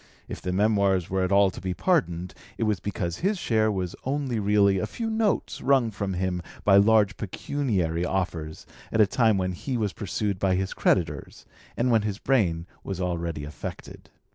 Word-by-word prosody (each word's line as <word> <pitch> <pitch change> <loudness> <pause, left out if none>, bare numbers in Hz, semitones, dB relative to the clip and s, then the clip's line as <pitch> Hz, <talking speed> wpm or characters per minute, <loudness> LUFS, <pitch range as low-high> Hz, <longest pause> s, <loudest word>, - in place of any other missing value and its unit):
If - - -7
the 90 - -2
Memoirs 100 -2 +2
were 95 0 +1
at 90 - -1
all 100 -1 +5
to - - -10
be 90 0 -3
pardoned, 90 - 0 0.2
it - - -1
was 105 -4 +1
because 85 -4 -3
his 200 +3 0
share 110 -9 +1
was 95 -3 -3
only 135 -3 -1
really 100 -1 +3
a - - -2
few 225 -1 -4
notes 220 -2 0
wrung 130 -4 +3
from 100 -2 -3
him 90 -1 -1 0.2
by 100 -1 +6
large 105 0 +4
pecuniary 95 - -1
offers 85 -4 -3 0.3
at 110 - 0
a 105 - +8
time 110 +1 +2
when 95 -1 0
he 125 +8 -3
was 105 -4 -1
pursued 100 -1 -2
by 95 -1 +2
his 95 +1 -2
creditors, 75 -6 -1 0.3
and 125 +1 +2
when 115 -2 +4
his 105 -2 -3
brain 95 -12 +1 0.2
was 95 -2 -5
already 85 -4 -2
affected. 75 +1 -8
100 Hz, 185 wpm, -26 LUFS, 90-110 Hz, 0.3 s, a